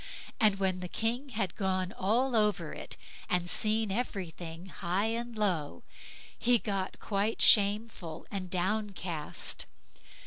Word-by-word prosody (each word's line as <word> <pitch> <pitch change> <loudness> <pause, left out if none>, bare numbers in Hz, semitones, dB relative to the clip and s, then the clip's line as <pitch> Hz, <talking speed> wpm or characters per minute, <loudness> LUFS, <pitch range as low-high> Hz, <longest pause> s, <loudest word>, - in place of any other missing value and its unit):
And 215 -3 +5
when 190 -2 0
the 180 - -4
King 235 +8 -1
had 210 -7 -1
gone 185 -2 0
all 235 +8 +1
over 210 -7 +2
it, - - -6 0.3
and 180 -1 +1
seen 215 +2 +3
everything 180 -6 -4
high 185 +2 -1
and 235 0 -4
low, 165 - 0 0.6
he 245 0 +5
got 195 -4 -3
quite 205 +2 -1
shameful 200 -5 +3
and 190 -2 -4
downcast. 185 -4 -2
195 Hz, 125 wpm, -31 LUFS, 180-220 Hz, 0.6 s, And